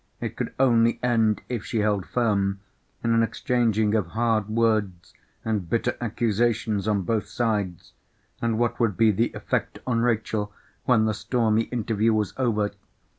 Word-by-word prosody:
It - - -4
could - - -3
only 115 -3 +3
end, 115 -3 +2
if 120 -4 -3
she 115 - -1
held 105 -3 0
firm, 100 -5 0 0.4
in 115 - +2
an 115 - +4
exchanging 115 -2 +1
of 105 -6 +1
hard 110 -3 +1
words 110 -5 0 0.3
and 105 -6 -2
bitter 115 - 0
accusations 110 -2 0
on 100 -3 +1
both 105 +2 -1
sides. 105 -7 -2 0.5
And 115 -2 0
what 120 0 0
would 115 -6 +1
be 115 -1 +5
the 115 +4 0
effect - - -2
on 115 -3 +1
Rachel 110 -3 0 0.3
when 115 -3 +4
the 110 - +1
stormy 110 0 +1
interview 115 -2 0
was 105 -2 -1
over? 110 -5 0
110 Hz, 155 wpm, -25 LUFS, 105-115 Hz, 0.5 s, be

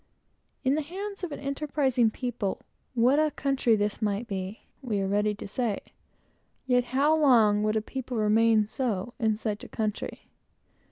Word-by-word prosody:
In 265 0 +3
the 310 - +1
hands 390 +6 -6
of 350 - -3
an - - -5
enterprising 275 -4 +1
people, 230 -4 -3 0.3
what 250 +5 +4
a 310 0 +3
country 270 -5 +1
this 210 +1 -1
might 210 +2 -1
be! 195 0 -5 0.2
we 225 -6 -1
are 195 - 0
ready 210 +1 +1
to 205 - -8
say. 220 0 -1 0.9
Yet 245 -1 +3
how 280 +5 +3
long 230 -9 +5
would 215 0 +1
a 215 - 0
people 255 0 -5
remain 215 0 +4
so, 235 -3 -2
in 220 -3 +2
such 215 -1 -3
a - - -9
country? 215 -2 -4
235 Hz, 165 wpm, -28 LUFS, 210-270 Hz, 0.9 s, long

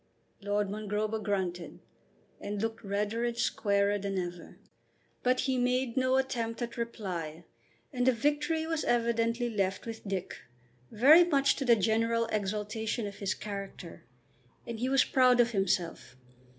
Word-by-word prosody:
Lord 205 0 0
Mongrober 215 +1 -2
grunted 185 -4 -2 0.6
and 205 0 -4
looked 225 +1 -3
redder 205 +3 -1
and 240 -1 -1
squarer 200 -3 +1
than 195 -1 -3
ever; 175 -2 -5 0.6
but 250 0 +2
he 260 -1 0
made 250 -1 0
no 260 0 +2
attempt 235 -4 -2
at 235 - -5
reply, 180 -9 -5 0.5
and 250 0 0
the - - +7
victory 295 +6 0
was 325 -1 -2
evidently 235 0 +1
left 195 -4 -1
with 225 -2 -7
Dick, 195 -2 -4 0.5
very 290 +10 +7
much 280 -5 +3
to 270 - -2
the 240 -2 +6
general 230 +2 +1
exaltation 215 +2 -2
of 200 -1 -7
his 200 -2 -2
character. 200 -4 -7 0.6
And 230 -2 -6
he 250 +2 0
was 270 0 +5
proud 255 -2 +4
of 240 0 +4
himself. 180 - -1
225 Hz, 145 wpm, -30 LUFS, 200-245 Hz, 0.6 s, the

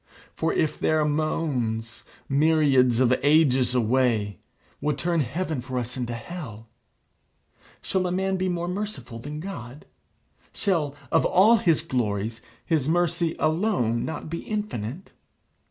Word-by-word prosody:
For 165 0 0
if 155 -2 0
their 155 -1 +2
moans, 135 -7 -1 0.2
myriads 140 -5 +3
of 130 -1 +4
ages 135 -4 +4
away, 115 -5 +1 0.4
would 150 -1 0
turn 170 +3 0
heaven 155 +1 -2
for 130 0 -5
us 125 0 -3
into 120 -2 -3
hell 115 -5 -8 1.2
shall 185 -1 0
a - - -2
man 190 +1 0
be 185 0 0
more 175 -1 -2
merciful 195 - -5
than 145 +5 -6
God? 150 -7 -8 0.7
Shall, 160 -8 0 0.2
of 160 - +4
all 215 +6 +5
his 165 -7 +2
glories, 115 -5 -2 0.2
his 155 -3 +1
mercy 170 -1 +1
alone 155 - +1
not 160 -1 -5
be 170 +2 -4
infinite? 190 - -4
150 Hz, 130 wpm, -25 LUFS, 125-170 Hz, 1.2 s, all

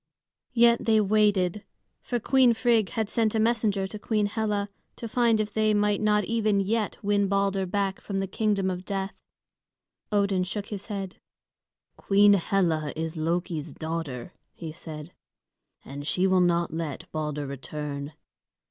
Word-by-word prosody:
Yet 235 0 +5
they 220 -1 +4
waited; 205 -2 +2 0.4
for 245 - -2
Queen 250 0 +4
Frigg 225 -3 +2
had 220 +4 -2
sent 225 0 0
a - - +2
messenger 220 -3 +1
to 210 +2 -7
Queen 215 -1 0
Hela 205 -1 -1 0.3
to 230 - -6
find 230 -1 +2
if 210 -1 -2
they 215 -1 +2
might 205 0 +1
not 210 -1 +3
even 215 -1 +1
yet 210 +2 -1
win 200 0 +2
Balder 195 -1 +1
back 195 0 -1
from 195 -2 -3
the 195 - 0
kingdom 195 -1 0
of 180 0 -5
death. 195 0 -3 1.0
Odin 200 -3 +2
shook 200 +2 -4
his 200 -2 -6
head. 195 -3 -5 0.8
"Queen 205 +1 +5
Hela 170 -5 +1
is 160 +1 -3
Loki's 165 -1 -2
daughter," 160 -4 -5 0.2
he 165 -2 -7
said, 155 0 -9 0.7
"and 145 +2 -7
she 180 +3 +1
will 185 -1 +4
not 170 -1 +1
let 160 -3 -4
Balder 150 -2 -3
return." 140 +1 -6
195 Hz, 150 wpm, -27 LUFS, 170-215 Hz, 1.0 s, Yet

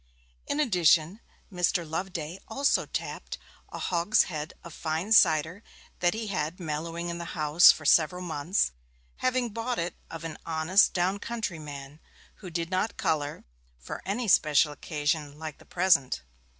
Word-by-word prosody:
In 290 - -1
addition, 180 - +3 0.3
Mr. 175 -1 0
Loveday 170 +1 -4
also 275 +5 +1
tapped - - -5 0.3
a - - -6
hogshead 170 -3 +1
of 170 - -10
fine 160 +7 -3
cider 165 -2 +4 0.4
that 175 +3 +2
he 225 0 -4
had 170 -6 -2
had 180 - -25
mellowing 165 +1 -4
in 170 0 -4
the 170 - -6
house 155 +2 +7
for 155 - -8
several 175 +4 +3
months, 165 - 0 0.5
having 255 -1 0
bought 230 +3 -3
it 170 +1 -2 0.2
of 165 0 -8
an 165 -2 -6
honest 165 +5 +3
down 185 +3 0
country 215 -7 -4
man, 145 -1 -9 0.4
who 185 - -9
did 170 +1 -3
not 185 +4 -1
colour, 150 -1 -1 0.3
for 60 - -8
any 220 +5 -2
special 155 -4 +4
occasion 150 0 -2
like 155 -1 -7
the - - -17
present. 175 -8 +2
170 Hz, 150 wpm, -28 LUFS, 155-190 Hz, 0.5 s, house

